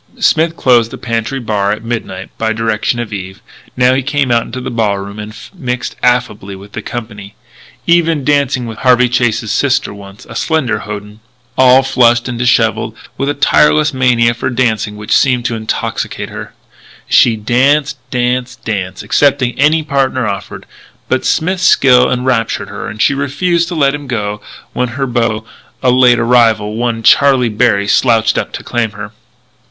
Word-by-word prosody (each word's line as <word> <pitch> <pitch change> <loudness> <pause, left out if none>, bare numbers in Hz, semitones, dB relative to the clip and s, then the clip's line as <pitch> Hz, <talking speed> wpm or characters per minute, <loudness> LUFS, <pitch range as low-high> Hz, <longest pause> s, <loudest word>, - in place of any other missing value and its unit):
Smith 165 +1 +2
closed 120 -3 +3
the - - -8
pantry 115 +2 -3
bar 105 -4 -1
at 110 +1 -4
midnight, 110 -5 -5
by 110 0 0
direction 110 +1 -1
of 115 -3 -5
Eve. 95 -1 -7 0.4
Now 125 0 +4
he 135 - +1
came 140 -1 -1
out 120 -1 +3
into 115 +2 -7
the 125 - -5
ballroom 100 -3 -2
and 105 +1 -8 0.2
mixed 125 -8 -4
affably 120 -5 0
with 100 +2 -13
the 110 - -6
company, 105 -4 -8 0.5
even 165 -3 +2
dancing 140 -3 +1
with 115 -2 -8
Harvey 125 -1 +4
Chase's 120 -2 0
sister 135 -6 0
once 100 0 -13
a - - -10
slender 130 -10 0
hoyden, 105 0 -8 0.4
all 130 +1 +5
flushed 120 -2 +2
and 120 -1 -5
dishevelled, 115 -2 +1 0.2
with 140 - -2
a 145 - -1
tireless 150 +1 +3
mania 120 -3 +2
for 120 +2 -3
dancing 110 -4 -1
which 105 0 -1
seemed 125 -3 +2
to 120 - -1
intoxicate 110 -1 -4
her. - - -9 0.5
She 115 - +4
danced, 135 +6 +1
danced, 125 0 -2
danced, 95 -4 -4
accepting 140 -4 +1
any 155 +3 +3
partner 135 -3 0
offered. 100 -1 -5 0.4
But - - 0
Smith's 185 +3 0
skill 125 -7 +4
enraptured 120 -5 -1
her 105 - -6
and 105 0 -8
she 145 - +3
refused 165 +5 0
to 175 - -5
let 140 -3 +2
him 145 -1 -6
go 105 -4 -3 0.3
when 125 - -1
her 135 - 0
beau, 115 -3 -1 0.4
a 125 - +4
late 125 -1 +5
arrival, 115 -3 +2
one 115 -1 -2
Charlie 130 +1 +4
Berry, 105 -2 +1
slouched 115 0 +2
up - - -4
to - - -6
claim 115 -3 -2
her. - - -8
120 Hz, 170 wpm, -14 LUFS, 110-135 Hz, 0.5 s, all